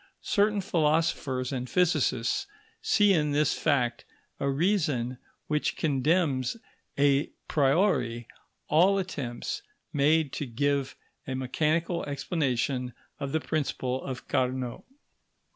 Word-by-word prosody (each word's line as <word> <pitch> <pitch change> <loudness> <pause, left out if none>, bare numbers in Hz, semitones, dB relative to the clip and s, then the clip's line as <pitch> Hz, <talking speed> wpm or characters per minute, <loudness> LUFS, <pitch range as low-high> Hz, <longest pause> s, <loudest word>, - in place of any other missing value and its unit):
Certain 205 0 +2
philosophers 155 -7 0
and 125 -1 -3
physicists 155 - +1 0.3
see 205 -2 +4
in 150 -4 +1
this 150 +1 +3
fact 125 -6 0 0.4
a 140 - 0
reason 140 - 0 0.3
which 150 0 -1
condemns 145 - +1 0.4
a 140 0 +3 0.2
priori 135 - +2 0.4
all 185 +6 +4
attempts 150 - -4 0.3
made 150 0 +3
to 145 - -3
give 140 +3 0 0.3
a 130 - -2
mechanical 155 +6 0
explanation 135 -4 -1 0.2
of 140 -2 -3
the 160 - +1
principle 130 -4 -2
of 130 -1 -6
Carnot. 130 -2 -1
145 Hz, 105 wpm, -28 LUFS, 130-160 Hz, 0.4 s, see